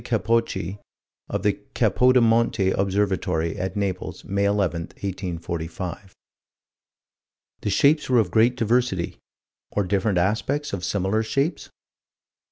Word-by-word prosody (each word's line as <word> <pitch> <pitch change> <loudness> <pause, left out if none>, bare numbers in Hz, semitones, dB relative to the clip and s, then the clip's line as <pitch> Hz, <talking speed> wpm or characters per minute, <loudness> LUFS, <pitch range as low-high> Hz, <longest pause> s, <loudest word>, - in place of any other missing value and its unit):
Capocci, 110 -4 0 0.5
of - - -2
the - - +1 0.2
Capodimonte 115 -5 +3
Observatory, 95 -4 0
at 95 +3 -3
Naples, 95 -3 -3
May 100 +1 0
11, 100 -4 +1 0.2
1845. 90 0 -5 1.5
The - - -2
shapes 145 +10 +3
were 125 - +4
of 110 - +2
great 120 +3 +3
diversity 115 -6 0 0.5
or 105 - 0
different 95 +1 0
aspects 110 +10 0
of 95 -3 -3
similar 100 +3 0
shapes? 140 +8 -1
100 Hz, 105 wpm, -24 LUFS, 95-115 Hz, 1.5 s, were